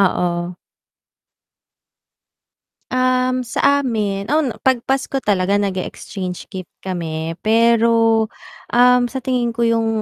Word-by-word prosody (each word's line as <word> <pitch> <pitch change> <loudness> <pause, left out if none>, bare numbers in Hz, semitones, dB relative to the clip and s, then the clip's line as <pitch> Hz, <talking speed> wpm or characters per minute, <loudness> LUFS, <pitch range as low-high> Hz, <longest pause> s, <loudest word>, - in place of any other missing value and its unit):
Oo. 175 -2 0 2.4
Um, 255 0 +1
sa 280 +4 +2
amin 210 -6 -2
on 305 -4 +2
pag 260 -3 +2
Pasko 270 0 -1
talaga 195 -1 +1
nag-e-exchange 185 -1 -4
gift 185 -3 -8
kami, 165 -3 -3
pero, 230 0 +3 0.5
um, 250 +1 +5
sa 265 - -8
tingin 245 -3 -1
ko 235 - -2
yung 230 -1 +1
225 Hz, 100 wpm, -19 LUFS, 190-250 Hz, 2.4 s, um